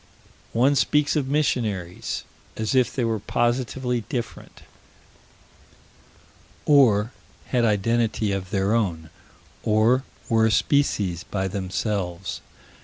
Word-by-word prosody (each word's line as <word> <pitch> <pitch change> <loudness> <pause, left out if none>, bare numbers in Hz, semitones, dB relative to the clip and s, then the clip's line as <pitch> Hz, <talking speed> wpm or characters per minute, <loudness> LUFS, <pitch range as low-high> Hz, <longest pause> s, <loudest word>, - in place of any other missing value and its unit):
One 130 +5 +4
speaks 150 +2 +2
of 145 -4 0
missionaries, 110 - -1 0.3
as 110 +2 -1
if 130 -2 +3
they 125 - 0
were 110 -1 0
positively 120 +2 -1
different, 120 -2 -6 2.0
or 115 -7 +4 0.4
had 120 -2 +2
identity 110 0 +1
of 95 -2 -3
their 100 +2 +1
own, 85 -9 -1 0.5
or 110 +4 +3 0.2
were 110 -1 +3
a - - +1
species 105 - +1
by 95 -1 -2
themselves. 95 -2 -3
110 Hz, 105 wpm, -24 LUFS, 100-125 Hz, 2.0 s, One